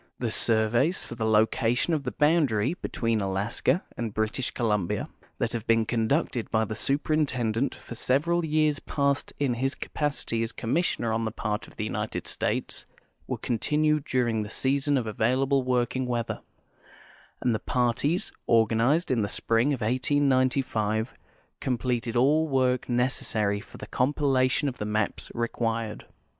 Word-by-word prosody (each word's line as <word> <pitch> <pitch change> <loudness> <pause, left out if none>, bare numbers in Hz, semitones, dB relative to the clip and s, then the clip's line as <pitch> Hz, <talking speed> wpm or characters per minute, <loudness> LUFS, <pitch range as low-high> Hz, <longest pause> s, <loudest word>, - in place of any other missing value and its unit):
The 120 -3 -2
surve}'S 115 - +1
for - - -7
the 110 -1 -2
location 115 +6 +2
of 155 - +1
the - - -4
boundary 145 -6 +2
between 115 -10 -1
Alaska 100 - 0
and 115 -2 -3
British 110 +4 0
Columbia, 105 -7 -1 0.3
that - - -1
have 115 -2 -4
been 115 -1 +3
conducted 120 +2 0
by 110 0 +2
the 110 - -4
Superintendent 135 -2 0
for - - -10
several 155 +9 +1
years 155 -2 +2
past 140 -1 -1
in 140 -4 +1
his 135 +4 -1
capacity 145 -6 -2
as 115 0 -2
commissioner 120 -3 0
on 115 +1 0
the 110 - 0
part 105 -1 -3
of - - -17
the - - -3
United - - -3
States, - - -2 0.4
were - - -2
continued 150 +5 +1
during 120 -5 0
the 105 - -5
season 140 +4 +1
of 125 - -1
available 130 +6 +1
working 125 0 0
weather, 120 -2 -2 1.0
and 120 - +1
the 110 - -1
parties 125 +8 0 0.2
organized 115 - +3
in 120 -3 +2
the 100 - -1
spring 115 +5 +1
of 130 -4 -2
1895 130 -3 +1 0.5
completed 125 -2 -1
all 150 +6 +4
the - - -9
work 130 -1 +1
necessary 115 -4 +1
for - - -13
the - - -8
compilation 135 0 +1
of 130 - -4
the 105 - -2
maps 105 0 -1
required. 115 -2 -2
125 Hz, 150 wpm, -27 LUFS, 110-140 Hz, 1.0 s, all